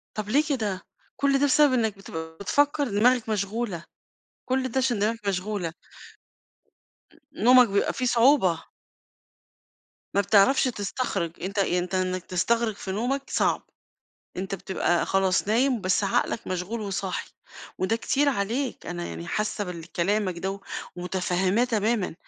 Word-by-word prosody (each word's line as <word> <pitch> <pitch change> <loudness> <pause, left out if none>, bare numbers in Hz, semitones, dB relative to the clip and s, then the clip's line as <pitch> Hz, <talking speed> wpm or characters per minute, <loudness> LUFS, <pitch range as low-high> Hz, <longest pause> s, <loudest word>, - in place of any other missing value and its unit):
طب 210 -1 -4
ليه 290 +6 +4
كده؟ 210 -9 -1 0.3
كُلّ 275 -1 +2
ده 285 - +3
بسبب 290 -1 +4
إنك 220 -4 +1
بتبقى 160 -4 -8
بتفكَر 285 +7 +2
دماغك 230 +3 +3
مشغولة، 205 -3 -2 0.7
كُلّ 260 0 +1
ده 265 - -2
عشان 250 -4 +1
دماغك 210 0 -1
مشغولة. 185 -2 -2 1.6
ن - - -5
نومك 250 0 +7
بيبقى 200 0 +1
فيه 255 - -2
صعوبة. 235 - +4 1.5
ما 200 - +5
بتعرفش 200 +7 +4
تستخرج، 210 -6 -2
أنت 200 +2 -2
أنت 180 -1 0
إنك 185 -1 -1
تستغرق 225 +5 0
في 190 - -6
نومك 250 +7 -1
صعب، - - +1 0.8
أنت 190 +1 -3
بتبقى 175 -2 0
خلاص 195 +1 +1
نايم 245 +1 +2
بس 185 +2 +1
عقلك 210 +3 0
مشغول 185 +5 -3
وصاحي، 195 -2 -3 0.5
وده 205 +5 +1
كتير 285 +5 +1
عليك، 245 +2 -2
أنا 85 0 -4
يعني 85 0 -7
حاسّة 210 - -2
بال 170 -2 -8
كلامك 190 0 0
ده 195 +2 -4 0.4
ومتفهّماه 185 +4 0
تمامًا، 220 -5 0
205 Hz, 135 wpm, -26 LUFS, 185-240 Hz, 1.6 s, نومك